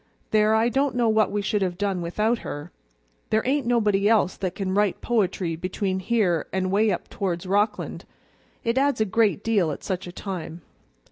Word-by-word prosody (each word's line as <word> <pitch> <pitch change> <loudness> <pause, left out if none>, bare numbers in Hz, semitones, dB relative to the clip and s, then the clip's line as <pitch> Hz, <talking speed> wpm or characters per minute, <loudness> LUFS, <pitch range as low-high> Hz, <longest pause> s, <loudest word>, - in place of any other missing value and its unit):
There, 215 0 +4
I 225 +2 +3
don't 270 0 0
know 240 -2 +2
what 215 -2 +3
we 205 0 -1
should 210 0 0
have 180 -2 -1
done 195 -2 -1
without 215 +7 0
her; 145 +4 -7 0.6
there 220 0 +2
ain't 270 -1 +1
nobody 210 -4 +2
else 210 -5 +3
that 185 -2 -3
can 190 -2 -2
write 205 -1 +1
poetry 190 -7 0
between 185 +2 -2
here 190 -6 +1
and 185 -1 -1
'way 210 +2 +3
up 185 - -2
towards 180 -2 -3
Rockland; 205 +3 -1 0.6
it 230 +3 +1
adds 280 -2 +1
a 220 - +3
great 210 0 +1
deal 205 -7 +2
at 145 - -5
such 185 -2 -3
a - - -7
time. 175 -3 -6
205 Hz, 190 wpm, -24 LUFS, 185-220 Hz, 0.6 s, There